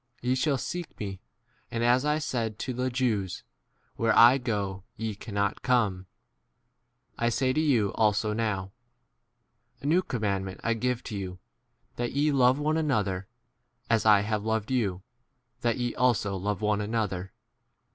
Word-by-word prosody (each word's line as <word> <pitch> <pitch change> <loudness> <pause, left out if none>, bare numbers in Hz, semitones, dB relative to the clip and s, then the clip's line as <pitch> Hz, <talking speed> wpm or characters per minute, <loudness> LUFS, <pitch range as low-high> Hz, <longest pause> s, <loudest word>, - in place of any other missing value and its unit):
Ye 125 +1 0
shall 135 +2 +1
seek 175 +6 -5
me; 95 -3 -5 0.5
and, 115 0 -2
as 125 +2 +4
I 150 0 +2
said 115 -8 -2
to 130 - -3
the 125 +1 -1
Jews, 115 -8 -1 0.5
Where 115 0 +2
I* 120 +4 +8
go 100 -6 -2
ye* 110 -1 -3
cannot 100 -1 -2
come, 105 -7 +1 1.1
I 120 - +2
say 130 +2 +1
to 155 - +1
you 120 -10 +2
also 105 0 +2
now. 105 -4 -2 1.0
34 - - -42
A - - -9
new 165 +5 +4
commandment 100 - -2
I 115 - +2
give 125 +1 -1
to 110 - -6
you, 95 -2 -5 0.6
that 120 0 -2
ye 145 +2 +2
love 130 -1 +4
one 155 +2 +1
another; 105 - 0 0.6
as 115 -1 +3
I 105 -2 +6
have 105 0 -1
loved 110 +1 -1
you, 100 -8 0 0.6
that 120 -2 0
ye* 120 -1 -1
also 120 -5 +2
35 95 -2 -4
love 105 0 -1
one 105 -1 +1
another. 105 -4 -2
115 Hz, 160 wpm, -28 LUFS, 100-125 Hz, 1.1 s, I